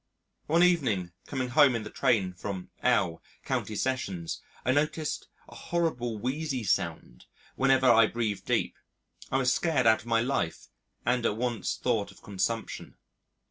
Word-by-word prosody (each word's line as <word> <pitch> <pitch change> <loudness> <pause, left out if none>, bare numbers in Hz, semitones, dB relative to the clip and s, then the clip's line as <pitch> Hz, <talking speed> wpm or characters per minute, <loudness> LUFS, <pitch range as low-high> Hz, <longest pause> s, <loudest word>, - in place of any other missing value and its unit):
One 165 +3 +4
evening 125 - +2 0.2
coming 130 -3 -2
home 135 0 +5
in 115 - -2
the 105 - -8
train 110 -9 +1
from 95 0 -6
L 85 0 +2 0.2
County 110 - -2
Sessions 95 -9 -2 0.2
I 130 - +3
noticed 150 +2 -1 0.2
a - - -14
horrible, 125 -10 -2
wheezy 130 +2 -2
sound - - -2 0.3
whenever 135 -1 +3
I 115 -2 +7
breathed 110 -3 -2
deep. - - 0 0.5
I 135 - +2
was 130 -1 +3
scared 160 -7 +1
out 110 -1 +6
of - - -14
my 115 -1 +3
life, 120 -10 -2 0.4
and 120 0 +1
at 105 -2 0
once 120 -4 -2
thought 110 -5 0
of 100 - -17
consumption. 105 +3 -3
120 Hz, 150 wpm, -29 LUFS, 105-135 Hz, 0.5 s, I